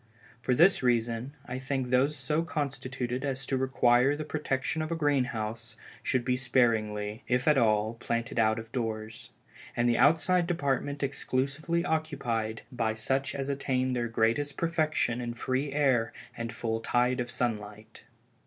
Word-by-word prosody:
For 125 +1 +1
this 175 +8 +5
reason, 120 +2 0
I 125 0 -4
think 130 -1 -2
those 135 +4 +3
so 150 +4 0
constituted 130 -5 -3
as 135 -1 -2
to 135 - -1
require 130 0 +3
the 155 - -4
protection 150 0 -2
of 155 +1 -3
a - - +1
green 145 -5 +2
house, 115 -1 -5 0.2
should 130 -2 0
be 125 0 +2
sparingly, 110 -3 +1
if 125 +2 +1
at 150 - +6
all, 110 -3 +2
planted 115 +1 -2
out 110 0 +3
of 110 0 -7
doors, 110 -3 -4 0.5
and 120 0 +3
the 120 - +2
outside 170 +4 +4
department 145 -3 -1
exclusively 140 +5 -1
occupied 120 -9 -2
by 115 -3 -1
such 135 +5 -1
as 135 -1 -3
attain 130 -2 0
their 120 -1 0
greatest 115 +5 0
perfection 155 -7 0
in 120 -1 -4
free 130 +4 -1
air 135 -5 +2 0.2
and 115 0 -4
the 115 - -8
full 115 -1 -2
tide 125 +2 +1
of 120 0 -2
sunlight. 105 -2 -4
125 Hz, 160 wpm, -29 LUFS, 115-140 Hz, 0.5 s, at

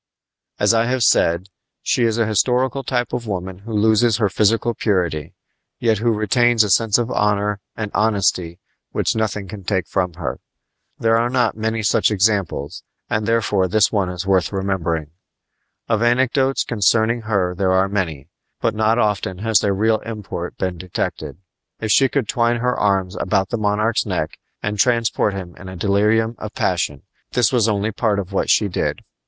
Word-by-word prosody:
As - - +4
I 115 0 +3
have 125 0 0
said, 85 -1 +2 0.3
she 120 - +1
is 115 -1 0
a 115 - +2
historical 125 +5 +1
type 125 -2 -2
of 125 -1 -3
the - - -7
woman 95 -1 -4
who 110 +4 -10
loses 110 +1 +3
her 105 -4 +1
physical 110 +4 +1
purity, 90 -9 -1 0.4
yet 110 -3 +1
who 115 +1 +2
retains 115 +2 +3
a 105 - -1
sense 110 +1 +3
of 120 0 -2
honor 105 -1 0 0.2
and 110 -2 -4
of - - -3
honesty 95 -5 +1 0.4
which - - 0
nothing 105 -3 -2
can 100 0 -9
take 95 -2 -1
from 90 -3 -1
her. 70 -7 -4 0.6
There 115 0 +2
are 120 +1 +1
not 125 -1 +1
many 110 0 -2
such 100 - +3
examples, 95 -7 0 0.3
and 105 0 0
therefore 105 -4 +1
this 105 +2 +3
one 100 -4 0
is 90 +1 -5
worth 95 -2 +2
remembering. 85 -6 -2 0.8
Of 110 -2 +1
anecdotes 130 +3 +2
concerning 115 +2 +1
her 100 -5 0
there 95 +1 0
are 95 +1 +3
many, 85 -9 -3 0.3
but 115 - 0
not 110 +1 +2
often 105 -5 0
has 110 +1 +2
their 100 - 0
real 110 +2 +2
import 105 -6 -6
been 90 -2 -3
detected. 90 -2 -4 0.4
If 110 -1 -2
she 135 +3 +5
could 135 -6 -1
twine 120 +2 +1
her 125 +1 0
arms 95 -2 0
about 95 -3 0
the 120 - -2
monarch's 105 +2 0
neck 90 -5 -3 0.2
and 105 0 -3
transport 115 -3 +2
him 90 -3 -7
in 95 - -10
a 95 - -8
delirium 105 +5 +2
of 105 0 -7
passion, 85 -6 -1 0.3
this 125 +1 +2
was 115 -3 +3
only 105 +1 0
part 110 -1 0
of 100 -1 -4
what - - 0
she 105 - +4
did. 95 - -2
105 Hz, 180 wpm, -20 LUFS, 95-115 Hz, 0.8 s, she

